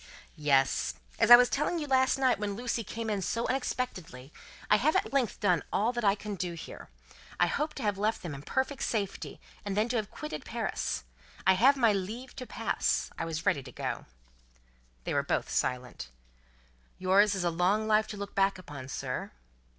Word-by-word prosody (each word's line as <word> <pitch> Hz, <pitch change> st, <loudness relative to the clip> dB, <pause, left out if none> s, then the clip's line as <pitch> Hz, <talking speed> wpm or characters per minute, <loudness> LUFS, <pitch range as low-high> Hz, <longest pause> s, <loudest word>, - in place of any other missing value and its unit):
"Yes. 135 Hz, -3 st, +2 dB, 0.2 s
As -, -, +4 dB
I 240 Hz, -, +14 dB
was 245 Hz, +1 st, +6 dB
telling 300 Hz, +7 st, 0 dB
you 310 Hz, -, -2 dB
last 260 Hz, -1 st, +3 dB
night 260 Hz, -5 st, +2 dB
when 205 Hz, -1 st, -2 dB
Lucie 235 Hz, 0 st, -2 dB
came 225 Hz, +2 st, -5 dB
in 205 Hz, -2 st, -1 dB
so 230 Hz, +5 st, -1 dB
unexpectedly, 185 Hz, -, -3 dB, 0.3 s
I 210 Hz, -, +5 dB
have 300 Hz, +8 st, +2 dB
at -, -, 0 dB
length 255 Hz, -7 st, +1 dB
done 180 Hz, -6 st, +2 dB
all 225 Hz, +5 st, +1 dB
that 240 Hz, -1 st, -3 dB
I 200 Hz, -1 st, +4 dB
can 210 Hz, 0 st, -6 dB
do 180 Hz, -2 st, -3 dB
here. 165 Hz, -, -9 dB, 0.5 s
I -, -, +6 dB
hoped 305 Hz, +1 st, -2 dB
to 270 Hz, -, -4 dB
have 205 Hz, -2 st, 0 dB
left 215 Hz, +2 st, 0 dB
them 170 Hz, -4 st, -5 dB
in 140 Hz, -, -7 dB
perfect 265 Hz, -, -2 dB
safety, 200 Hz, -4 st, -3 dB, 0.2 s
and 200 Hz, -1 st, -3 dB
then 215 Hz, +2 st, +3 dB
to 245 Hz, -, 0 dB
have 215 Hz, -2 st, -2 dB
quitted 305 Hz, 0 st, -6 dB
Paris. -, -, -3 dB, 0.4 s
I 190 Hz, -, +7 dB
have 265 Hz, +9 st, +5 dB
my 230 Hz, -5 st, +4 dB
Leave 220 Hz, +7 st, -5 dB
to 255 Hz, -, -6 dB
Pass. -, -, -1 dB
I -, -, -1 dB
was 165 Hz, 0 st, -4 dB
ready 140 Hz, -, +2 dB
to 125 Hz, -1 st, -11 dB
go." -, -, -4 dB, 1.0 s
They -, -, -3 dB
were -, -, +3 dB
both -, -, -1 dB
silent. 125 Hz, -, -2 dB, 0.9 s
"Yours 200 Hz, +2 st, +4 dB
is 190 Hz, -, -2 dB
a 175 Hz, -, +1 dB
long 185 Hz, +6 st, +2 dB
life 215 Hz, 0 st, +3 dB
to 215 Hz, -, -7 dB
look 200 Hz, 0 st, -6 dB
back 195 Hz, 0 st, +2 dB
upon, 145 Hz, -7 st, -9 dB
sir?" 135 Hz, -, -4 dB
205 Hz, 195 wpm, -30 LUFS, 180-245 Hz, 1.0 s, I